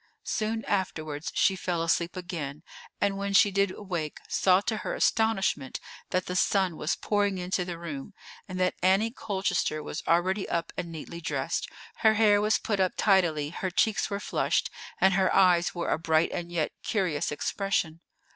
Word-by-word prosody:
Soon 225 0 -2
afterwards 155 -6 -2
she 195 - +3
fell 175 -2 -2
asleep 170 +1 0
again, 160 -5 -5 0.4
and 200 -1 0
when 200 0 -2
she 200 +1 +6
did 200 0 +2
awake 180 -6 -4
saw 185 -1 +4
to 220 +2 -2
her - - -3
astonishment 195 - +1 0.3
that 185 0 0
the 180 - -4
sun 190 -2 +2
was 155 +2 -1
pouring 205 -2 0
into 180 0 -1
the 175 -1 -5
room, 165 +2 -7 0.3
and 185 -1 -5
that 185 0 +2
Annie 195 +5 +3
Colchester 190 - -1
was 150 - -5
already 185 +4 +1
up 170 -1 -2
and 170 - -4
neatly 165 +1 -8
dressed; - - -2 0.3
her 220 -1 +4
hair 205 -2 +5
was 215 +1 +3
put 205 -3 -2
up 185 -1 +2
tidily, 165 -7 +2
her 185 - -3
cheeks 210 +3 +1
were 200 -1 -2
flushed, - - 0 0.3
and 190 +1 +5
her 190 0 +2
eyes 180 -2 +4
wore 170 - -2
a - - +1
bright 160 0 +2
and 175 0 -4
yet 165 -3 -1
curious 180 -10 -1
expression. 165 0 -1
185 Hz, 175 wpm, -28 LUFS, 165-200 Hz, 0.4 s, she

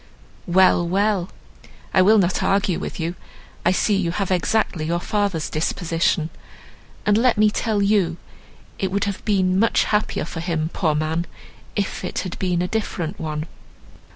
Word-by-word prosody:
"Well—well! 185 +2 +3 0.6
I 185 - +5
will 215 +4 +6
not 185 -2 +2
argue 195 -2 +1
with - - -6
you; 165 +1 -2 0.5
I 175 - +4
see 205 +2 +2
you 190 -3 0
have 190 +2 -2
exactly 180 -3 +1
your 170 +2 0
father's 200 -4 -1
disposition; 165 0 0 0.7
and 210 - +4
let 250 -1 +3
me 215 0 +4
tell 210 -2 0
you 195 -5 +2 0.6
it 190 - 0
would 200 +1 0
have 200 -1 -3
been 190 -3 +2
much 230 - +3
happier 210 0 0
for 165 - -6
him, 160 -1 -2
poor 155 -5 +1
man! 160 +2 -1 0.5
if 200 -2 -2
it 180 - -4
had 180 - -6
been 180 -2 0
a - - -1
different 190 -4 -3
one." 155 -1 -3
185 Hz, 155 wpm, -22 LUFS, 170-205 Hz, 0.7 s, will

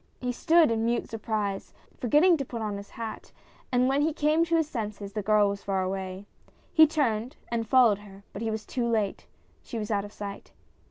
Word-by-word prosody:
He 250 -1 -2
stood 320 +3 +4
in 225 0 0
mute 235 +1 0
surprise, 210 -3 -3 0.2
forget 290 +6 +3
ting 365 -2 +6
to 275 - -2
put 240 -2 -6
on 205 -2 -2
his 200 0 -9
hat, 225 -1 -7 0.4
and 250 0 +3
when 275 +2 +2
he 310 +1 +1
came 305 +2 +2
to 335 0 +1
his 320 -2 +2
senses 210 -6 -5
the 210 - -2
girl 210 0 +4
was 200 0 -4
far 195 -1 -1
away. 190 +1 -4 0.5
He 315 -1 +8
turned, 255 -4 -1 0.2
and 230 -1 -1
followed 240 -6 +5
her, 200 -1 -14
but 200 - -6
he 225 - -1
was 220 -1 -4
too 245 -2 -2
late. 215 -4 -1 0.3
She 235 - -7
was 215 0 -3
out 200 -1 +1
of 205 - -9
sight. 205 -1 -8
225 Hz, 215 wpm, -27 LUFS, 205-260 Hz, 0.5 s, He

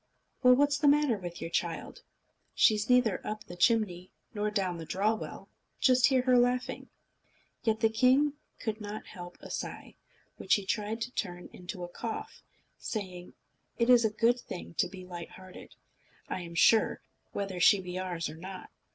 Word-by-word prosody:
"Well, 250 -1 +7
what's 290 +2 +2
the 295 - +3
matter 290 -4 +4
with 175 -2 -7
your 165 - -5
child? - - -3 0.5
She's 215 0 +4
neither 250 -5 +4
up 215 0 -5
the 175 - -10
chimney 185 -2 +2 0.2
nor 210 0 -1
down 190 -5 -1
the - - -5
draw 205 +6 +1
well. 220 - -7 0.3
Just 255 -1 +5
hear 260 -3 +2
her 250 -1 +5
laughing." 250 +1 0 0.7
Yet 220 -1 0
the 225 - +5
king 255 +6 +4 0.3
could 220 -1 -3
not 210 +1 -6
help 175 -2 -10
a - - -9
sigh, - - -6 0.4
which - - +3
he 205 - -3
tried 215 +3 -2
to 240 +2 -3
turn 180 -7 -5
into 180 0 -7
a - - -4
cough, 220 +5 -6 0.4
saying: 185 -5 -5 0.4
"It 235 +1 +3
is 240 -1 +7
a 220 - +3
good 230 +3 +2
thing 180 -6 -8
to - - +3
be 185 0 -10
light 175 -2 -7
hearted, 185 0 -13 0.5
I 185 - -3
am 170 -1 -8
sure, 220 +5 +4 0.3
whether 195 -2 -3
she 195 +3 +6
be 180 0 -5
ours 175 -3 -3
or 155 +2 -8
not." 185 +2 -9
210 Hz, 175 wpm, -30 LUFS, 180-245 Hz, 0.7 s, Well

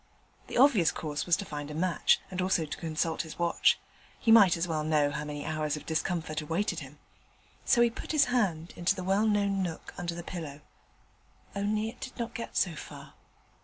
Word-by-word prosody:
The - - -4
obvious 240 - +5
course 150 0 -4
was 175 0 +4
to 200 - -5
find 145 -3 -6
a 150 - -6
match, 175 +1 +2
and 185 0 -2
also 180 -3 +1
to 150 - -6
consult 160 0 -1
his 160 -2 -9
watch: 170 0 +3 0.4
he 225 - +2
might 200 -7 +7
as 170 +2 -1
well 155 -2 -1
know 150 -2 +2
how 150 +1 -3
many 145 -1 -5
hours 155 -1 -1
of 150 - -10
discomfort 160 -1 -2
awaited 165 +3 -1
him. 140 0 -11 0.7
So 240 - +4
he 235 -1 +4
put - - -6
his 305 -3 +4
hand 190 -10 0
into 175 - +1
the 185 - -5
well 195 +4 +2
known 200 -2 +1
nook 170 -3 -5
under 170 -1 -3
the 170 - -6
pillow: 155 -5 -7 0.9
only, 210 +2 0
it 240 - -12
did 260 - -8
not 235 -2 -4
get 235 -3 -5
so 175 - +2
far. 155 - -10
170 Hz, 200 wpm, -29 LUFS, 155-200 Hz, 0.9 s, might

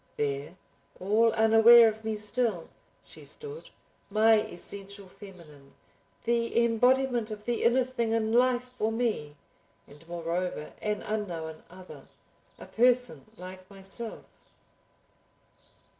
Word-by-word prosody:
There, 145 +3 -3 0.4
all 220 +4 +3
unaware 225 +1 +7
of 220 0 -3
me 220 0 -2
still, 210 -4 -2 0.4
she - - -13
stood, 450 +1 -10 0.4
my 215 +2 +4
essential 200 0 -9
feminine, 165 -8 -15 0.5
the 235 0 +1
embodiment 245 0 +2
of 210 -1 -7
the 240 +1 -2
inner 245 +3 +4
thing 235 -3 -2
in 225 -1 0
life 250 0 +2
for 220 +1 +1
me—and 155 -7 -6
moreover 170 -1 -4
an 210 -1 -2
unknown 170 -7 -4
other, 185 +1 -13 0.5
a - - -11
person 245 0 +1
like 185 0 -10
myself. 200 +4 -8
215 Hz, 110 wpm, -28 LUFS, 185-235 Hz, 0.5 s, unaware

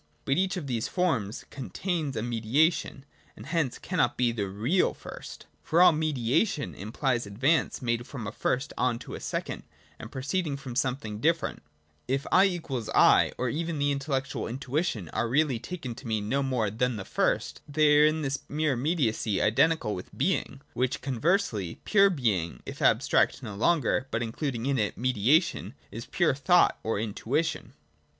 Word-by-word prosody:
But 135 +5 +1
each 190 0 0
of 170 - -4
these 120 -3 -2
forms 130 - -1
con 135 -3 -7
tains 165 -8 -2
a 110 - -2
mediation, 130 +5 +1 0.3
and - - -10
hence 160 -7 -1
cannot 160 -10 0
be 120 -2 +2
the 105 -4 -3
real 120 - +1
first: - - -10 0.2
for 165 - +1
all 180 - +8
mediation 150 - 0
implies 120 +3 -2
advance 135 +8 +1
made 120 0 -1
from 125 -6 -6
a 105 - -4
first 130 +4 -1
on 125 -1 +1
to - - -9
a - - -5
second, - - -4 0.4
and - - -9
proceeding 140 +2 -2
from 135 -3 -8
something 125 -5 -2
different. 165 +6 0 0.5
If 135 +2 -1
1 190 +2 +6
= 180 -2 -2
1, 125 -5 +3
or 125 - -1
even 165 +3 -2
the 145 0 +1
intellectual 135 -1 -2
intuition, 130 - -2
are 120 - -1
really 140 -2 +2
taken 140 -3 -6
to 120 +2 -10
mean 110 -2 -1
no 140 +5 +1
more 125 -6 0
than 125 +3 0
the 100 -3 -6
first, - - -1
they 150 0 +4
are 150 - +7
in 155 0 0
this 140 0 -1
mere 150 -1 +1
immediacy 120 - 0
identical 115 +1 +2
with 90 - -8
being: - - -1
while 130 +1 +1
conversely, 130 - 0
pure 200 -1 +5
being, 100 - -1
if - - -8
abstract 130 - +3
no 110 -4 -6
longer, 130 +3 +1
but 115 - -1
including 120 +1 -3
in 135 -2 +1
it 105 -2 -1
mediation, 130 - +1 0.2
is 115 - -7
pure 175 -6 +2
thought 145 +6 +3
or 110 -2 -1
intuition. 115 +8 -2
130 Hz, 170 wpm, -28 LUFS, 115-155 Hz, 0.5 s, all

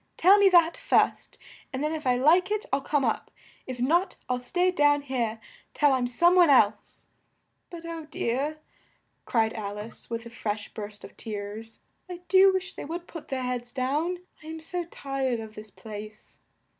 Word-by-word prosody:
Tell 390 +4 +6
me 400 -1 +7
that 345 +2 +5
first, - - +1 0.3
and 260 +2 -3
then 305 +1 0
if 305 -4 -4
I 250 - +4
like 330 +9 +4
it, 425 +2 -1
I'll 275 - +2
come 280 -1 0
up; 225 - -1 0.4
if 255 -1 -6
not, 335 +10 +2
I'll 250 0 0
stay 355 +9 +1
down 290 -4 +3
here 235 -5 -2 0.4
till 290 -2 +4
I'm 250 -2 +1
some 345 +9 +4
one 355 -3 +6
else' 215 -6 +2 0.6
but, 335 -1 -9
oh 330 -1 -6
dear," 290 +1 -2 0.7
cried 225 -2 +1
Al 205 -1 -5
ice 215 +2 -8
with 230 0 -4
a 235 - -10
fresh 215 -2 -4
burst 205 -1 -7
of - - -11
tears, 215 +1 -6 0.3
"I 355 -1 -7
do 385 0 +7
wish 370 -1 -3
they - - -7
would 340 +3 -5
put 330 -3 -10
their 260 -1 -3
heads 245 -1 -3
down! 290 +7 -1 0.2
I 305 - -13
am 320 0 -6
so 350 +2 -2
tired 270 -6 -2
of 220 -1 -8
this 215 0 -9
place!" 215 +1 -10
270 Hz, 185 wpm, -27 LUFS, 230-335 Hz, 0.7 s, me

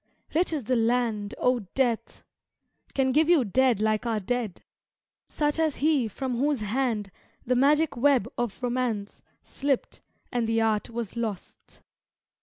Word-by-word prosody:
Rich 340 +3 +2
is 300 -5 -2
the 255 +4 0
land, 230 -3 0
O 250 0 +2 0.2
Death! 245 -4 -1 0.7
Can 265 -1 +2
give 310 +4 +3
you 320 -8 +5
dead 250 +1 +2
like 215 +2 +1
our 225 -2 0
dead! 220 -2 -3 0.7
Such 295 +1 0
as 315 -3 +1
he 290 -5 +2
from 250 +3 -3
whose 285 -3 +1
hand 215 -2 -1 0.3
The 250 - +1
magic 295 +4 +3
web 260 -3 +3
of 240 0 -3
romance 240 -5 -2 0.2
Slipt, 275 -2 -2 0.3
and 240 -2 0
the 225 0 +1
art 220 -2 +1
was 235 -3 -5
lost! 220 -5 -6
245 Hz, 145 wpm, -27 LUFS, 220-270 Hz, 0.7 s, you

